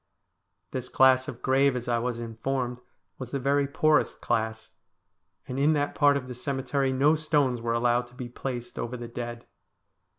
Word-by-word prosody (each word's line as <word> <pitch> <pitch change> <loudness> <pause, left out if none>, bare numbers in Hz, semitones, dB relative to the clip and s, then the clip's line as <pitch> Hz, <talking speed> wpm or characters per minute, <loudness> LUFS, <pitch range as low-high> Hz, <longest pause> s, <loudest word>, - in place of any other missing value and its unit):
This 130 -1 -4
class 130 0 +5
of 125 -5 -8
grave, 135 0 +3
as 125 0 -4
I 120 -1 +1
was 120 0 -2
informed, 120 +2 -3 0.4
was 130 -2 -6
the 140 - -2
very 140 +1 +2
poorest 155 +1 +2
class, 110 -1 -2 0.8
and 130 +1 -4
in 150 +3 +4
that 145 -1 0
part 145 -2 +4
of 130 -2 -6
the 125 - -6
cemetery 135 +1 -1
no 140 +4 +4
stones 145 -6 +1
were 115 0 -1
allowed 120 +1 +2
to 120 - -20
be 125 -1 -6
placed 120 0 -6
over 125 +2 -3
the 120 0 -7
dead. 120 0 -6
130 Hz, 175 wpm, -27 LUFS, 120-140 Hz, 0.8 s, class